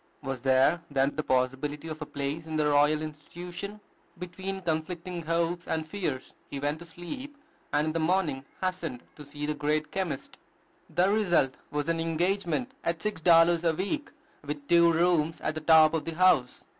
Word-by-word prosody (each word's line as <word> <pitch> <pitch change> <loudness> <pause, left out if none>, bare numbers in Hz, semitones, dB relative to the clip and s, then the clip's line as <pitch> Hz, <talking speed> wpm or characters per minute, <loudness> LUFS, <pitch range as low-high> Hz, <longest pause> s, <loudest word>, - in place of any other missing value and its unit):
Was 135 -2 -4
there, 135 +6 +3
then, 140 0 +1
the 155 - 0
possibility 135 +3 -1
of 155 0 -6
a 150 - -4
place 145 +3 -4
in 160 - -4
the 150 - +2
Royal 150 +1 +3
Institution? 175 +7 -7 0.4
Between 190 +2 -5
conflicting 170 +1 -3
hopes 170 +2 -1
and 160 -1 -1
fears, 155 -8 -4 0.2
he 140 - -5
went 145 +2 -1
to 170 - -11
sleep, 260 - -8 0.3
and 150 - +2
in 155 - -1
the 165 - 0
morning 160 -5 +1 0.2
hastened 170 -9 -3
to 150 - -10
see 145 +1 -6
the 150 - 0
great 150 +1 -1
chemist. 190 -4 -4 0.6
The 185 +3 +4
result 175 -11 +2
was 145 +1 -2
an 165 0 0
engagement 175 +6 0
at 170 -1 0
six 210 -6 -2
dollars 165 0 +5
a 165 -2 +2
week, 245 - -2 0.3
with 145 0 -6
two 170 0 +6
rooms 165 -1 +2
at 155 - -1
the 155 - -5
top 155 0 +6
of 160 - -1
the 165 - -4
house! 175 -8 +3
160 Hz, 180 wpm, -28 LUFS, 150-175 Hz, 0.6 s, two